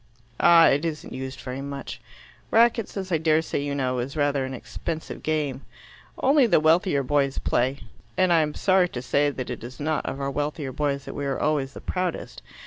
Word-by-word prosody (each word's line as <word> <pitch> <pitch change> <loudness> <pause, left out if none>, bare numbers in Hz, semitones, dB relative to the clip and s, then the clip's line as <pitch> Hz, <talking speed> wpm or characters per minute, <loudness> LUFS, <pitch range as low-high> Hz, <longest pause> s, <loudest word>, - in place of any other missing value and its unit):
"Ah, 170 -1 +7
it 145 +1 +3
isn't 160 -2 -4
used 130 0 -6
very 130 +1 -5
much. 140 0 -7 0.5
Racquets, 230 -2 +3
as 190 -1 -4
I 165 - +2
daresay 160 -1 +1
you 140 0 -2
know, 130 -2 -1
is 135 +5 -4
rather 145 -2 +1
an 130 0 -5
expensive 160 +5 -6
game. 150 -4 -1 0.6
Only 275 -1 +4
the 185 - +4
wealthier 160 -1 +3
boys 140 0 +1
play 130 +3 0 0.4
and 185 -2 +4
I'm 155 -2 +2
sorry 185 -2 +3
to 125 - -5
say 145 +3 +2
that 130 -3 -5
it 120 - -6
is 125 +2 -9
not 155 +1 -1
of 135 - -4
our 140 0 -2
wealthier 145 -1 -3
boys 140 0 -2
that - - -7
we 145 -1 -3
are 135 - -2
always 145 -3 0
the - - -9
proudest. 180 -2 -3
145 Hz, 195 wpm, -25 LUFS, 135-165 Hz, 0.6 s, Ah